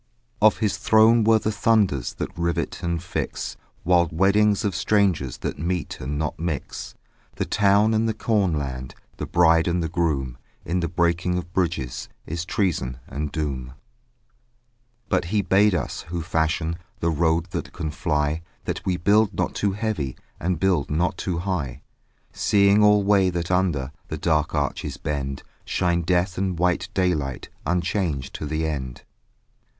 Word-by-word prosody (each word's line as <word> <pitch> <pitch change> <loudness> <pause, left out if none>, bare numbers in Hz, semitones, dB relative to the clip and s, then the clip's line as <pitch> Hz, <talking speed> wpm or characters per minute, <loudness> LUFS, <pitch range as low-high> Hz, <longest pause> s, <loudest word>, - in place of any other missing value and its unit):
Of 110 0 +6
his 105 -3 0
throne 110 +1 +5
were 110 +1 +5
the 110 0 -1
thunders 105 - +1
That - - -5
rivet 85 0 -2
and 85 -2 -2
fix - - -3 0.3
Wild 85 -1 +3
weddings 100 +5 +3
of 100 -4 0
strangers 95 - +1
That - - -4
meet 85 +1 -2
and 70 +3 -3
not 75 0 -2
mix; 80 -5 -4 0.4
The - - -1
town 105 +2 +3
and 110 +1 +2
the 110 - -2
cornland; 75 - -1 0.2
The - - -4
bride 80 -1 +4
and 85 0 +1
the - - 0
groom: 70 -7 -1 0.3
In 90 +2 0
the 85 - 0
breaking 85 +1 +1
of 90 -1 -6
bridges 85 -10 -2 0.2
Is 85 +2 -4
treason 85 - -1
and 75 +1 -4
doom. 65 -5 -3 1.3
But 90 - +1
he 100 +3 0
bade 100 +1 +4
us, - - -3
who 85 -1 -3
fashion 80 +1 0 0.2
The 85 - +1
road 80 +2 +1
that 85 - -4
can 80 -4 -4
fly, 75 -1 0 0.2
That - - -3
we 90 -2 0
build 100 +4 +3
not - - -1
too 100 -1 0
heavy 100 - -2 0.2
And 90 -1 -1
build 90 -6 +1
not 85 +4 +1
too 90 -3 -2
high: 80 -8 -3 0.5
Seeing 100 +1 +4
alway 100 -2 +5
that 85 -1 -3
under 85 -8 +1 0.2
The - - -4
dark 75 -1 +1
arch's 70 -2 -2
bend 70 -3 -3 0.2
Shine 85 -1 0
death 90 +1 0
and 95 -2 -1
white 90 -2 +1
daylight 80 -8 0 0.2
Unchanged 85 -5 -1
to 75 - -5
the 80 +1 -1
end. 65 -6 -4
85 Hz, 155 wpm, -24 LUFS, 75-95 Hz, 1.3 s, Of